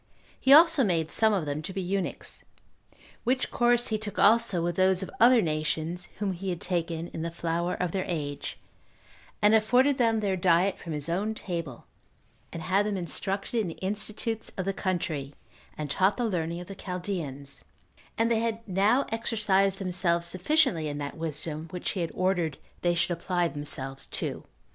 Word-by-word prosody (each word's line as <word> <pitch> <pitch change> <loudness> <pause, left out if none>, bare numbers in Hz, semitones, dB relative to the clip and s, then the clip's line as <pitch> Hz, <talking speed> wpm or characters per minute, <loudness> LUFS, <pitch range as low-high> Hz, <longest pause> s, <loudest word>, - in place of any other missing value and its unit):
He 265 - +2
also 320 -1 +8
made 165 -6 0
some 220 -1 +4
of 190 -6 0
them 145 +1 -3
to 175 +5 -5
be 190 - -4
eunuchs; 190 0 -3 0.8
which 255 +2 0
course 240 0 +2
he 215 -1 0
took 210 -2 -6
also 220 -3 +4
with 175 0 -1
those 185 0 +3
of - - -7
other 235 -1 +6
nations 160 +2 -2
whom 205 -1 -1
he 190 +2 -5
had 175 -2 -2
taken 170 -2 -2
in 160 - -6
the 165 - -2
flower 170 +1 -2
of 180 -2 -2
their 190 0 -2
age, 145 -5 -4 0.8
and 210 +1 +6
afforded 250 +6 +4
them 225 -2 +3
their 200 -3 0
diet 180 +1 +2
from 165 - -6
his 150 0 -2
own 200 +6 -1
table, 170 - -4 0.7
and 165 - -6
had 195 +4 +2
them 205 -2 -1
instructed 195 +6 -2
in 210 - 0
the 165 - -6
institutes 215 +3 -3
of 185 - -2
the 195 - 0
country, 160 -8 -2 0.4
and 150 -2 -4
taught 190 +6 +2
the 245 - 0
learning 170 -5 -2
of - - -8
the 195 - -8
Chaldeans; 175 -8 -5 0.5
and 230 +1 +2
they 225 - +3
had 230 0 -2
now 205 +8 +3
exercised 205 -4 +1
themselves 180 -3 +2
sufficiently 180 - +2
in 145 -1 -4
that 145 -1 -5
wisdom 155 0 -4
which 180 -1 -3
he 195 - -4
had 165 - -1
ordered 180 -6 0 0.2
they 175 0 +2
should 180 +1 +1
apply 175 0 0
themselves 135 -3 -4
to. - - -3
185 Hz, 180 wpm, -28 LUFS, 165-210 Hz, 0.8 s, also